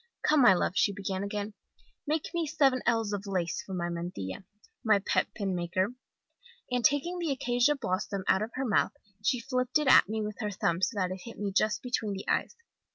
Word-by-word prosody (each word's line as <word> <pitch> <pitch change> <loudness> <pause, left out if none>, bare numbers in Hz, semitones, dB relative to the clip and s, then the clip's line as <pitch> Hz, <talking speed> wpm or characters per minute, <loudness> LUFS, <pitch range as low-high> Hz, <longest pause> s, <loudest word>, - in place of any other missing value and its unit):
"'Come, 300 -2 +4
my 200 -7 +7
love!' 175 - 0
she 200 - +3
began 195 -1 -3
again, 205 +1 -4 0.5
'make 310 +1 -1
me 340 -2 -1
seven 275 -4 +2
ells 225 -3 +1
of 200 0 -4
lace 180 -4 -1
for 190 - -7
my 175 -1 -1
mantilla, 170 - -5 0.4
my 215 -2 +5
pet 195 - +1
pin 200 -4 -2
maker!' 180 +5 -1 0.8
"And 250 -1 0
taking 315 +7 +2
the 335 -2 -1
acacia 245 +2 +2
blossom 195 -4 -2
out 190 - +3
of 215 - -2
her 265 +1 -1
mouth 215 - +2 0.3
she 250 +3 +2
flipped 255 +2 0
it 300 -2 -1
at 255 - +7
me 220 0 -1
with 210 0 -5
her 210 -3 -2
thumb 180 -3 -1
so 225 - +1
that 185 -1 0
it 185 0 -6
hit 230 - -9
me 205 -1 -2
just 215 +2 +1
between 230 -4 -1
the 195 - -7
eyes. - - 0
210 Hz, 210 wpm, -29 LUFS, 190-255 Hz, 0.8 s, my